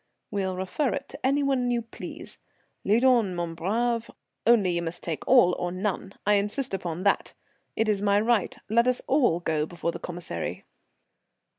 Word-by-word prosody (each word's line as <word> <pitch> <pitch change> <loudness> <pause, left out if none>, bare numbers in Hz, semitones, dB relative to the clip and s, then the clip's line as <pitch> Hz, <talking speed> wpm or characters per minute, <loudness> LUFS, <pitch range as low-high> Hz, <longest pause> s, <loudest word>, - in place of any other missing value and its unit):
"We'll 190 -2 -1
refer 190 +10 -1
it 280 - -6
to 280 - -9
any 280 +2 +2
one 265 -3 +1
you 240 -1 0
please. 230 - -9 0.4
Lead 225 +6 +3
on, 230 -8 +4
mon 170 -1 -3
brave, 230 +7 -1 0.4
only 215 -6 +5
you 170 0 0
must 170 +1 -5
take 165 -3 -3
all 240 -9 +6
or 175 - -2
none. 195 +1 -3
I 210 - +4
insist 210 +5 -1
upon 175 -2 -3
that. 200 - +1 0.4
It 220 - +1
is 205 -2 +1
my 205 0 +3
right; 225 -2 +1
let 235 +3 +3
us 250 -1 +1
all 255 - +3
go 155 -2 0
before 170 0 -3
the - - -7
Commissary." 170 - -5
205 Hz, 175 wpm, -26 LUFS, 175-240 Hz, 0.4 s, all